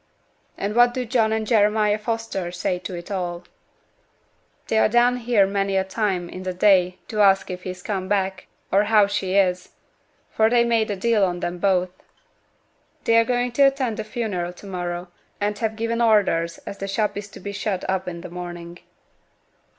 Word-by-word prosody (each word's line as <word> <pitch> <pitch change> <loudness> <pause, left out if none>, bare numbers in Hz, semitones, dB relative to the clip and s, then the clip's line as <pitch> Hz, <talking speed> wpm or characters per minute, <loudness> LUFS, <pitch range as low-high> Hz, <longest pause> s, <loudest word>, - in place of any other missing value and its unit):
'And 200 +1 -2
what 240 0 +5
do 255 -1 -2
John 225 -2 +1
and 220 0 -1
Jeremiah 210 -1 +3
Foster 225 -5 -3
say 180 0 -2
to 180 - -6
it 175 +4 -8
all?' 175 -2 -3 1.2
'They're 220 -1 +3
down 240 +2 +3
here 235 -4 +3
many 195 0 0
a 190 - +2
time 190 -2 -2
in 185 +2 -8
t' 185 - -2
day 185 -1 +3
to 215 -1 -1
ask 195 -2 +4
if 180 0 -6
he's 185 -1 -7
come 190 -3 -3
back, 190 -2 -1 0.2
or 200 +2 +4
how 210 -1 +5
she 200 -2 -2
is; 185 -2 +2 0.6
for 220 0 +3
they 240 0 +4
made 230 -2 +1
a 205 - -1
deal 215 +1 +2
on 175 -2 -1
'em 175 0 -3
both. 185 -1 +1 1.1
They're 230 0 +4
going 245 +1 0
t' 240 - -1
attend 270 -5 +3
t' - - -2
funeral 210 -6 -3
to 180 - -14
morrow, 175 -2 -4 0.3
and 205 0 -1
have 220 -1 -1
given 230 +1 -1
orders 200 -7 +2
as 200 - -7
t' 195 - -4
shop 205 +1 -1
is 205 0 -5
to 200 - -13
be 200 +2 -6
shut 200 -2 -3
up 190 0 -1
in 170 -1 -6
t' - - -6
morning.' 175 0 -8
200 Hz, 185 wpm, -23 LUFS, 180-220 Hz, 1.2 s, what